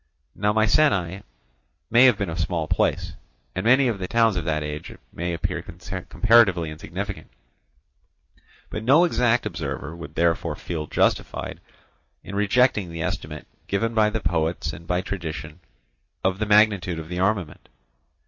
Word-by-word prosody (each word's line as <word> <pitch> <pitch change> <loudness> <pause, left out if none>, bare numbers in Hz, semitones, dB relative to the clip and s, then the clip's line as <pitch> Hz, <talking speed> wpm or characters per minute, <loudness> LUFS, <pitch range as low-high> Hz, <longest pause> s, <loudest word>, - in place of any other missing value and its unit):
Now 105 +1 +1
Mycenæ 105 - +2 0.7
may 120 +3 +7
have 125 -5 +5
been 100 -5 -2
a - - -4
small 85 -1 -1
place, - - 0 0.4
and 95 - -3
many 130 +3 +5
of 110 -5 -1
the 90 - -3
towns 115 -2 +3
of 85 -2 -2
that 75 -2 0
age 75 0 -6 0.2
may 85 +1 -3
appear 85 - -2
comparatively 90 +1 +2
insignificant, 95 +6 -6 1.4
but 110 - -4
no 140 +9 +6
exact 120 -9 +2
observer 85 -4 -4
would 80 -2 -10
therefore 85 -2 +1
feel 80 -2 -5
justified - - -1 0.6
in - - -9
rejecting 105 -1 +2
the 85 -1 -5
estimate - - -4 0.2
given 115 +4 0
by 110 -1 +4
the 110 0 -3
poets 80 -1 -1
and 85 +2 -11
by 90 +1 0
tradition 80 -5 -6 0.6
of 95 +1 0
the 110 - -1
magnitude 105 -5 +3
of 80 -1 -6
the 90 +1 -4
armament. 95 -5 -1
95 Hz, 150 wpm, -24 LUFS, 85-110 Hz, 1.4 s, may